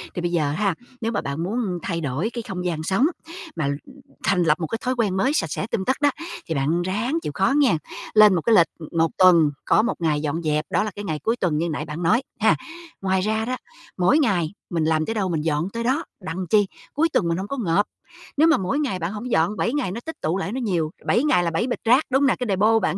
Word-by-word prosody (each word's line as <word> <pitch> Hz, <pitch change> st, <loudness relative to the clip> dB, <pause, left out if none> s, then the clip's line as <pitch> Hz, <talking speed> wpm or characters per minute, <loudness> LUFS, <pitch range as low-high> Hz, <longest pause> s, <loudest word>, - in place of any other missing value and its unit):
Thì 175 Hz, -, -2 dB
bây 175 Hz, -, -1 dB
giờ 155 Hz, -4 st, +1 dB
ha, 190 Hz, +3 st, 0 dB, 0.3 s
nếu 225 Hz, 0 st, -1 dB
mà 205 Hz, -, -1 dB
bạn 140 Hz, +4 st, -3 dB
muốn 195 Hz, -2 st, -2 dB
thay 170 Hz, -2 st, -2 dB
đổi 150 Hz, -, -1 dB
cái 240 Hz, -, -3 dB
không 185 Hz, -4 st, -5 dB
gian 165 Hz, -3 st, -2 dB
sống 190 Hz, -, +2 dB, 0.5 s
mà 140 Hz, -, -1 dB, 0.6 s
thành 185 Hz, -3 st, +2 dB
lập 155 Hz, -1 st, +3 dB
một 165 Hz, -, -2 dB
cái 225 Hz, -, -3 dB
thói 255 Hz, 0 st, -1 dB
quen 210 Hz, -6 st, 0 dB
mới 260 Hz, +9 st, +2 dB
sạch 305 Hz, -, +1 dB
sẽ 195 Hz, -, -3 dB
tươm 190 Hz, -4 st, -1 dB
tất 260 Hz, -, +1 dB
đó, 290 Hz, -, +5 dB, 0.4 s
thì 160 Hz, -, -2 dB
bạn 150 Hz, +6 st, +1 dB
ráng 210 Hz, -, -1 dB
chịu -, -, -3 dB
khó 195 Hz, +8 st, +2 dB
nghen. 260 Hz, -, +4 dB, 0.4 s
Lên 210 Hz, -3 st, +7 dB
một 165 Hz, -, 0 dB
cái 225 Hz, +4 st, +3 dB
lịch, 170 Hz, -, +6 dB
ừm, 155 Hz, -, -9 dB
1 165 Hz, 0 st, +3 dB
tuần 170 Hz, -5 st, +6 dB
có -, -, +4 dB
1 235 Hz, +3 st, -1 dB
ngày 155 Hz, -3 st, +1 dB
dọn 155 Hz, +2 st, -2 dB
dẹp, 150 Hz, 0 st, 0 dB
đó -, -, +2 dB
là 215 Hz, -, -3 dB
cái 205 Hz, 0 st, -6 dB
ngày 155 Hz, -3 st, -2 dB
cuối 225 Hz, +2 st, +1 dB
tuần 175 Hz, -9 st, 0 dB
như 170 Hz, +2 st, 0 dB
nãy 150 Hz, 0 st, -3 dB
bạn 155 Hz, +3 st, -5 dB
nói, 215 Hz, +10 st, +3 dB, 0.2 s
ha. 210 Hz, -7 st, +4 dB, 0.5 s
Ngoài 190 Hz, -1 st, +1 dB
ra 220 Hz, +2 st, 0 dB
đó, 255 Hz, +2 st, -2 dB, 0.4 s
mỗi 185 Hz, -, +4 dB
ngày 185 Hz, -, +1 dB, 0.2 s
mình 165 Hz, -3 st, 0 dB
làm 155 Hz, -1 st, +2 dB
tới 225 Hz, -, -2 dB
đâu 195 Hz, -4 st, 0 dB
mình 160 Hz, -3 st, -1 dB
dọn 160 Hz, +3 st, 0 dB
tới 230 Hz, 0 st, -3 dB
đó, 265 Hz, +7 st, 0 dB, 0.2 s
đặng 180 Hz, +1 st, -4 dB
chi? 205 Hz, 0 st, +4 dB, 0.3 s
Cuối 325 Hz, +3 st, +2 dB
tuần 170 Hz, -, +2 dB
mình 170 Hz, -, 0 dB
hông 190 Hz, +2 st, -4 dB
có 275 Hz, -, -4 dB
ngộp. 205 Hz, -3 st, +2 dB, 0.5 s
Nếu 315 Hz, +3 st, +5 dB
mà 330 Hz, -, +5 dB
mỗi 195 Hz, +10 st, -1 dB
ngày 265 Hz, -11 st, -1 dB
bạn 170 Hz, +1 st, -2 dB
hổng 235 Hz, +4 st, -5 dB
dọn, 175 Hz, +4 st, +2 dB
7 235 Hz, -, 0 dB
ngày 275 Hz, -11 st, -1 dB
nó 225 Hz, -, -4 dB
tích 320 Hz, -1 st, -7 dB
tụ 165 Hz, +4 st, 0 dB
lại 195 Hz, -, -3 dB
nó 255 Hz, -, -3 dB
nhiều, 170 Hz, -8 st, 0 dB
7 240 Hz, -, +2 dB
ngày 295 Hz, -12 st, +3 dB
là 170 Hz, -, 0 dB
7 175 Hz, +9 st, 0 dB
bịch 250 Hz, -, -2 dB
rác, 250 Hz, +6 st, +5 dB
đúng 265 Hz, +2 st, +3 dB
hông 280 Hz, -, +4 dB
nè? -, -, +3 dB
Cái 250 Hz, -, -2 dB
đề-pô 215 Hz, +3 st, +3 dB
bạn -, -, 0 dB
190 Hz, 270 wpm, -23 LUFS, 165-230 Hz, 0.6 s, Lên